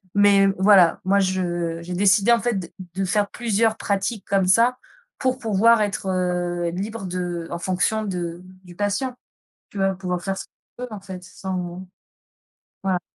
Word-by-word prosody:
Mais, 200 -1 +5
voilà 190 -3 +5
moi 200 +1 +3
je 175 -3 -1
j'ai 180 +1 -6
décidé 200 +4 +4
en 235 - +5
fait, 240 -3 0
d 175 -3 -6 0.2
de 195 0 0
faire 205 +2 +1
plusieurs 225 -1 0
pratiques 200 +2 -2
comme 195 -2 +2
ça 235 +6 +4 0.4
pour 255 0 0
pouvoir 225 0 +3
être, 200 -2 -2
heu, 175 -1 -1
libre 200 +3 -5
de 175 -2 -3
en 170 - -3
fonction 185 +5 0
de 175 -4 -4 0.2
du 175 -1 -13
patient. 205 +7 -1 0.5
Tu - - -11
vas 195 0 +2
pouvoir 180 -2 -3
faire 195 0 -3
ce - - -6
que - - -46 0.3
tu - - -4
veux 215 - -9
en 205 - -7
fait, 185 -2 -9
sans 180 0 -5 1.0
voilà. 185 -2 0
190 Hz, 175 wpm, -23 LUFS, 180-210 Hz, 1.0 s, Mais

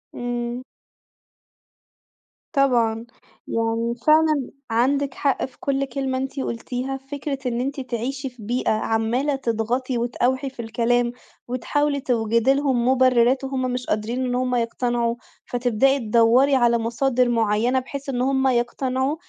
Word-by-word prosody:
إمم. 240 0 -3 1.9
طبعًا 235 -5 +2 0.4
يعني 230 +1 -1
فعلًا 310 -3 +4 0.2
عندِك 270 +4 +1
حق 275 -2 0
في 260 - -15
كُلّ 275 0 0
كلمة 265 0 -2
أنتِ 270 +2 -4
قولتيها، 255 +2 -3
فكرة 275 +1 -5
إن 240 -1 -1
أنتِ 275 +2 -3
تعيشي 260 +2 -3
في 245 -3 -14
بيئة 245 +4 0
عمّالة 225 +6 0
تضغطي 245 +1 -1
وتأوحي 250 +3 0
في 260 -2 -8
الكلام، 235 +1 +1 0.4
وتحاولي 280 +4 0
توجدي 230 0 +2
لهم 265 -4 +1
مبررات، 255 0 +4
وهُم 265 -1 -2
مش 250 0 -3
قادرين 230 +5 -1
إن 245 -1 -1
هُم 250 0 0
يقتنعوا، 235 0 0 0.3
فتبدأي 245 +3 +2
تدوّري 235 +4 +4
على 240 -2 +4
مصادر 240 +2 +1
معينة 230 +2 +2
بحيث 275 +2 -7
إن 245 -2 -1
هُم 265 +1 +2
يقتنعوا، 260 +3 0
250 Hz, 130 wpm, -23 LUFS, 235-270 Hz, 1.9 s, فعلًا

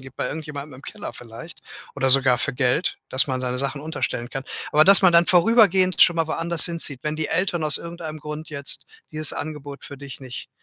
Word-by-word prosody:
gibt, 130 0 -14
bei - - -3
irgendjemandem 150 -2 -8
im 135 - -16
Keller - - -8
vielleicht 120 +8 -12 0.4
oder 130 0 +1
sogar 130 -2 +4
für 150 - -2
Geld, 130 +6 0
dass 130 - +2
man 130 -2 -3
seine 125 0 -3
Sachen 140 +1 -2
unterstellen 135 -5 -4
kann. 135 -1 -6 0.3
Aber 155 +1 +4
dass 195 0 +6
man 185 -2 +5
dann 170 0 +5
vorübergehend 185 -1 +3
schon 175 - +6
mal 165 -1 -1
woanders 165 +1 +1
hinzieht, 165 -6 0
wenn 150 0 -3
die 155 - -3
Eltern 175 -1 -1
aus 150 - +4
irgendeinem 165 -2 -8
Grund 150 +1 -8
jetzt 140 -2 -1 0.2
dieses 155 -1 +3
Angebot 145 -2 -8
für 140 - -10
dich 140 -1 -11
nicht 130 -2 -9
150 Hz, 210 wpm, -22 LUFS, 135-170 Hz, 0.4 s, dass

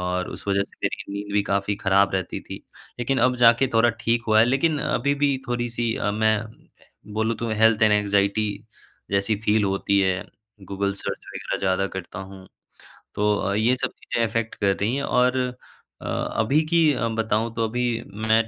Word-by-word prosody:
और 90 0 -2
उस - - -10
वज़ह 100 0 +2
से - - -13
मेरी - - -1
नींद 100 0 -5
भी 105 0 +2
काफ़ी 100 0 -1
ख़राब 100 0 +3
रहती 95 -2 -3
थी। - - -9 0.4
लेकिन 130 +2 0
अब 125 0 +3
जा 115 -1 +7
के - - +5
थोड़ा 120 +1 +5
ठीक 115 +1 +2
हुआ 110 - +5
है, - - +7
लेकिन 135 +5 +1
अभी 140 +2 0
भी 140 -2 +3
थोड़ी-सी 120 -1 -1
अ, 105 - -1
मैं 110 +1 -1 0.4
बोलूँ, 110 +1 0
तो 115 - -3
हेल्थ 110 0 +3
एंड 110 -1 +5
एंग्ज़ायटी 100 +1 +2 0.6
जैसी 100 +2 +1
फ़ील 105 -1 +2
होती 100 +1 +1
है, 95 -1 +1 0.4
गूगल 100 +1 -2
सर्च 100 - -6
वगैरह - - -3
ज़्यादा 95 0 +1
करता 95 +2 -7
हूँ। 95 0 -10 0.7
तो 105 0 +2
अ, 100 0 -1
ये 110 +5 +2
सब 130 - -2
चीज़ें 115 - -2
अफ़ेक्ट 115 0 -3
कर 100 -2 +1
रही 110 +6 -1
हैं 140 - -2
और 125 0 +2 0.6
अ, - - -10
अभी 135 +8 0
की 165 -3 +4
अ, 120 -2 -1
बताऊँ, 115 0 -1
तो 115 - 0
अभी 120 0 -1 0.3
मैं 110 0 +4
110 Hz, 190 wpm, -24 LUFS, 100-120 Hz, 0.7 s, जा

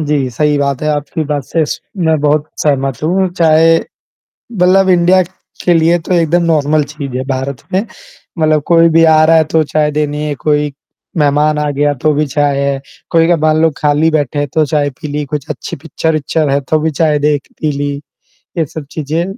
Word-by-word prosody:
जी 145 -4 0
सही 150 +4 +1
बात 140 -2 -1
है 155 - 0
आपकी 150 +1 -3
बात 145 -2 -3
से 165 - -1 0.4
मैं 160 -1 +2
बहुत 150 0 +1 0.2
सहमत 135 -2 -1
हूँ 185 +4 +1
चाहे 165 -1 +4 0.8
मतलब 190 0 +3
इंडिया 180 +1 +4 0.4
के 175 - +3
लिए 165 +2 +3
तो 170 - -5
एकदम 170 0 +2
नॉर्मल 155 -2 +1
चीज़ 140 -4 -6
है 130 - -3
भारत 130 -1 -3
में। 190 - +2 0.6
मतलब 155 -2 +2
कोई 165 -1 +5
भी 165 0 +4
आ 155 -1 +5
रहा 165 +1 +5
है 160 - +4
तो 160 +1 +1
चाय 150 0 0
देनी 150 0 -2
है 150 -1 -2
कोई, 150 +1 0 0.4
मेहमान 150 0 +2
आ 150 -1 -1
गया 145 +1 +1
तो 155 - +3
भी 150 +1 0
चाय 145 0 0
है। 140 0 0 0.3
कई 165 0 +4
कई 175 - +3
बार 155 0 +2
लोग 160 -1 +2
खाली 150 +2 +2
बैठे 145 -2 -1
हैं 145 -1 -1
तो 155 - +3
चाय 145 -1 0
पी 150 +3 -9
ली, 145 +1 -3
कुछ 145 -1 -5
अच्छी - - -5
पिक्चर 155 0 -1
है 140 +1 +1
तो 155 +3 0
भी 160 +1 0
चाय 150 0 +1
देख 145 -1 0
पी 155 -2 0
ली, 145 0 -2 0.7
ये 160 - +1
सब 150 +1 -8
चीज़ें 155 +2 -2
150 Hz, 200 wpm, -14 LUFS, 145-160 Hz, 0.8 s, कोई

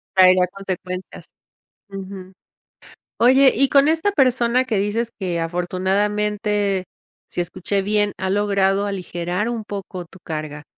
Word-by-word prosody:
Traerá 185 -1 +6
consecuencias. 185 -1 -6 0.6
Ujú. 190 -1 -8 0.9
Oye, 265 +2 +6
y 275 +1 +3
con 280 +1 +5
esta 325 +6 +2
persona 255 -5 +3
que 240 -4 -1
dices 215 +4 -1
que, 180 -4 -2
afortunadamente, 200 +3 0 0.4
si - - -3
escuché 185 +3 -1
bien, 205 +1 +1
ha 190 - -2
logrado 200 0 +2
aligerar 180 +1 -3
un 235 -2 -3
poco 195 -3 -6
tu 180 +3 -17
carga. 155 -2 -6
195 Hz, 125 wpm, -21 LUFS, 185-210 Hz, 0.9 s, Traerá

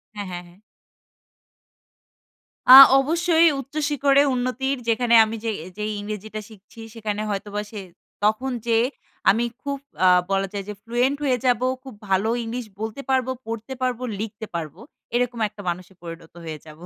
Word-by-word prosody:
হ্যাঁ, 205 -1 -5
হ্যাঁ, 175 0 -6
হ্যাঁ। 175 - -19 2.2
আ - - +13 0.3
অবশ্যই 335 +3 +3
উচ্চশিখরে 285 0 +1
উন্নতির 255 +2 -1
যেখানে 235 +1 +3
আমি 220 +1 -5
যে 225 - -1 0.3
যেই 210 0 -2
ইংরেজিটা 215 +1 -6
শিখছি 210 +1 -17
সেখানে 215 -2 -4
হয়তোবা 205 +1 -3
সে 215 - -6 0.4
তখন 220 +5 +1 0.2
যে 230 -1 +3 0.5
আমি 230 +4 +3 0.2
খুব 280 -1 -3 0.3
আ - - +7 0.2
বলা 195 0 +1
যায় 200 -1 -4
যে - - -4
fluent 245 +4 0
হয়ে 255 -3 +2
যাবো 250 0 +2 0.2
খুব 265 -3 -10 0.2
ভালো 195 +3 +2
ইংলিশ 235 +2 -5 0.2
বলতে 220 +5 -4
পারবো, 260 -1 +1 0.2
পড়তে 230 +3 -5
পারব, 250 -2 -1 0.2
লিখতে 220 0 -5
পারবো 160 0 -5 0.4
এরকম 245 -1 0
একটা 210 -1 -12
মানুষে 180 +2 -6
পরিণত 165 -1 -10
হয়ে 155 -1 -5
যাবো 155 +3 -13
225 Hz, 150 wpm, -23 LUFS, 205-255 Hz, 2.2 s, আ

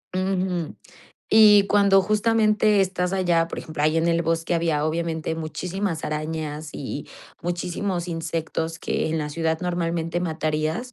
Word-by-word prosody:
Ujú. 185 -3 -1 0.5
Y 210 -2 +7
cuando 200 -1 +5
justamente 215 0 +3
estás 180 -1 0
allá, 175 -3 +2
por - - -7
ejemplo, 155 -1 -5
ahí 155 +1 +3
en 165 +1 +1
el 170 0 +2
bosque 165 +1 0
había 160 -3 +1
obviamente 160 0 -2
muchísimas 170 +2 -3
arañas 155 0 -4
y 145 +1 -6 0.4
muchísimos 175 +1 -2
insectos 165 0 -3
que - - -1
en 160 - -1
la 150 -1 -2
ciudad 160 +1 -1
normalmente 170 -1 -1
matarías. 160 +7 -2
170 Hz, 135 wpm, -24 LUFS, 160-190 Hz, 0.5 s, Y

